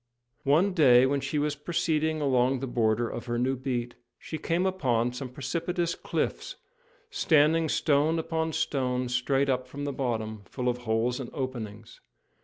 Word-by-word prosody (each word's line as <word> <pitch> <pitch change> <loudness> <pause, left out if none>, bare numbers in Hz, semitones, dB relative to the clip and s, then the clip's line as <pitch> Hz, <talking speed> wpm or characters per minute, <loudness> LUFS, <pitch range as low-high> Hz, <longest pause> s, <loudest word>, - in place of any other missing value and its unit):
One 165 +8 +3
day, 130 -7 +6
when 140 +1 +1
she 140 +3 -2
was 150 0 0
proceeding 155 0 0
along 130 -1 +2
the 135 - -3
border 115 -2 +1
of 120 - -6
her 120 0 -1
new 130 +2 +1
beat, 120 -2 -3 0.2
she 155 - -7
came 175 +2 0
upon 125 -11 +1
some 125 +1 -5
precipitous 170 +7 -2
cliffs, - - -3 0.6
standing 160 +1 +3
stone 150 +3 +2
upon 160 0 -2
stone 125 -4 -1
straight 135 +3 +1
up 130 -1 0
from 140 +3 -7
the 140 - -2
bottom, 110 -5 -3
full 125 +3 -2
of 125 0 -2
holes 120 +1 0
and 130 - -5
openings. 115 -5 -6
135 Hz, 160 wpm, -28 LUFS, 125-155 Hz, 0.6 s, day